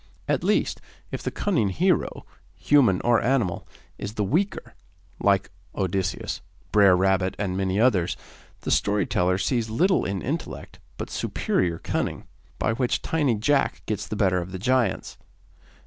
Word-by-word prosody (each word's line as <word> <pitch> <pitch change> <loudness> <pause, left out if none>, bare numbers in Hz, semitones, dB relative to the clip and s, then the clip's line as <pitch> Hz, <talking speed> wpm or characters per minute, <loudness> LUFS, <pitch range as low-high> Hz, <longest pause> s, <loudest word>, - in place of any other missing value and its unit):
At - - 0
least, - - +1 0.3
if - - -4
the - - -2
cunning 160 - 0
hero, 180 - 0 0.3
human 125 -11 +3
or 120 -1 +3
animal, 120 -7 0 0.3
is 100 +2 -5
the 105 - 0
weaker, 180 - -1 0.5
like 100 -2 +2 0.2
Odysseus, 95 -1 -2 0.3
Brer 100 -4 +6
Rabbit, 95 0 +2
and 95 -3 -2
many 95 +1 0
others, 100 -8 +2 0.4
the - - -3
story 105 0 +2
teller 90 +1 +1
sees 115 +2 0
little 180 - +2
in 95 -1 -3
intellect 155 +5 -5 0.2
but - - -6
superior 85 -2 -1
cunning, - - -3 0.3
by 110 - 0
which 125 +1 0
tiny 145 -7 +1
Jack 135 +7 +1
gets 105 -3 -3
the 110 - -4
better 95 -3 +2
of 90 +1 -6
the 95 - -4
giants. 125 +5 0
105 Hz, 150 wpm, -25 LUFS, 95-130 Hz, 0.5 s, Brer